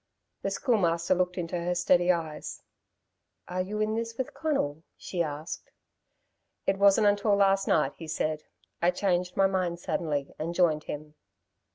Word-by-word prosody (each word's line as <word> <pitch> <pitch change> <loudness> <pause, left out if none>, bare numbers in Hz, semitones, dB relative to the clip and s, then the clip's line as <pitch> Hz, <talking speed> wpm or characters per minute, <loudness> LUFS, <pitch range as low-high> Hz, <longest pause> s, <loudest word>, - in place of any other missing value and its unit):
The - - -1
Schoolmaster 175 - +2
looked 180 0 0
into 175 0 -2
her 175 +1 -1
steady 175 0 +4
eyes. 160 -3 -4 0.8
"Are 180 +1 -2
you 205 +3 -3
in 215 0 +1
this 230 0 -3
with 260 - -3
Conal?" 160 - -1 0.2
she 180 - -3
asked. 155 0 -4 1.0
"I - - +6
wasn't 200 +2 +4
until 205 0 +3
last 195 -1 +3
night," 145 -3 +2
he 165 - -8
said. 155 0 -1 0.4
"I 170 - +4
changed 180 -1 0
my 195 - +5
mind 185 -3 0
suddenly 150 -5 -2
and 165 +2 -3
joined 160 -4 +2
him." 150 +1 -6
180 Hz, 155 wpm, -28 LUFS, 165-195 Hz, 1.0 s, I